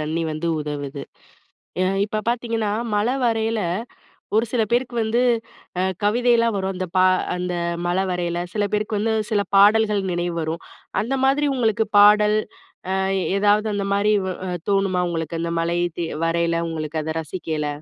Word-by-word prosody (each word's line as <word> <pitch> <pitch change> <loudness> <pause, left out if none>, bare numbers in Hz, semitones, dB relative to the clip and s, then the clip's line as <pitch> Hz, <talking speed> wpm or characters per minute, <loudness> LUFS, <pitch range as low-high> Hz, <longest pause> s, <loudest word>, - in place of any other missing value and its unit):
தண்ணி 155 +2 -2
வந்து 155 +2 -3
உதவுது. 145 -1 -5 0.8
எ - - +3 0.2
இப்ப 215 0 -3
பார்த்தீங்கன்னா, 230 -3 -1 0.2
மழ 205 +2 +1 0.2
வரையில 225 -1 +1 0.8
ஒரு 225 - +4
சில 235 -3 +2
பேருக்கு 245 +1 0
வந்து 220 +2 +1 0.6
அ - - +2 0.2
கவிதைலாம் 230 +1 +3
வரும். 190 0 -2
அந்த 185 0 -3
பா 185 - +5 0.3
அந்த 180 0 -3 0.3
மழ 175 +1 0
வரையில. 175 -1 -2 0.2
சில 210 -1 +1
பேருக்கு 210 0 -1
வந்து 220 +2 0 0.2
சில 205 -2 +2
பாடல்கள் 210 0 +5
நினைவு 175 0 -2
வரும். 160 +1 -4 0.4
அந்த 240 +5 -2
மாதிரி 290 +2 +2
உங்களுக்கு 220 -2 +1
பாடல், 210 +1 +6 0.6
அ - - +1 0.4
ஏதாவது 210 +2 +3
அந்த 200 -1 -2
மாரி 205 +1 +2
வ - - -1 0.4
தோணுமா 195 -2 +2
உங்களுக்கு? 165 -1 -3
அந்த 170 0 -2
மழை 170 +1 0 0.2
தே 170 - -1 0.2
வரையில, 170 0 +1
உங்களுக்கு 155 -1 -3
அத 160 +1 -4
ரசிக்கையில. 155 -2 -4
200 Hz, 150 wpm, -22 LUFS, 170-220 Hz, 0.8 s, பாடல்